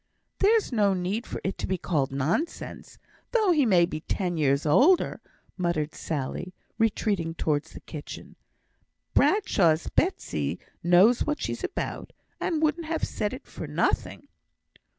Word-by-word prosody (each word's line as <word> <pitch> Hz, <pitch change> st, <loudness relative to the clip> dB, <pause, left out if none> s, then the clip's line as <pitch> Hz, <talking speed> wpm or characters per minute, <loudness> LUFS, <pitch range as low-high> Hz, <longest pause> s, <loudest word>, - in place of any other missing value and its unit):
"There's 430 Hz, -1 st, +3 dB
no 205 Hz, -5 st, +3 dB
need 190 Hz, +6 st, -2 dB
for -, -, -5 dB
it 190 Hz, -, -3 dB
to -, -, -2 dB
be 190 Hz, -, 0 dB
called 150 Hz, -7 st, -1 dB
nonsense, 150 Hz, -, -3 dB, 0.4 s
though 435 Hz, -6 st, +4 dB
he 295 Hz, -7 st, +3 dB
may 180 Hz, -5 st, +5 dB
be 170 Hz, -3 st, -5 dB
ten 175 Hz, +2 st, -2 dB
year 140 Hz, -3 st, +3 dB
older," 285 Hz, -, +4 dB, 0.4 s
muttered 170 Hz, -4 st, -1 dB
Sally, 160 Hz, +4 st, -4 dB, 0.2 s
retreating 200 Hz, -6 st, 0 dB
towards 150 Hz, -3 st, -1 dB
the -, -, -10 dB
kitchen. 150 Hz, -3 st, -9 dB, 0.8 s
"Bradshaw's 175 Hz, -, +3 dB
Betsy 375 Hz, +3 st, -1 dB, 0.2 s
knows 185 Hz, +8 st, +5 dB
what 300 Hz, 0 st, -1 dB
she's -, -, -4 dB
about, -, -, -4 dB, 0.3 s
and 320 Hz, -3 st, -1 dB
wouldn't 315 Hz, +1 st, 0 dB
have 325 Hz, 0 st, -2 dB
said 210 Hz, -, -1 dB
it 260 Hz, +2 st, -8 dB
for -, -, -8 dB
nothing." -, -, -1 dB
190 Hz, 140 wpm, -27 LUFS, -, 0.8 s, may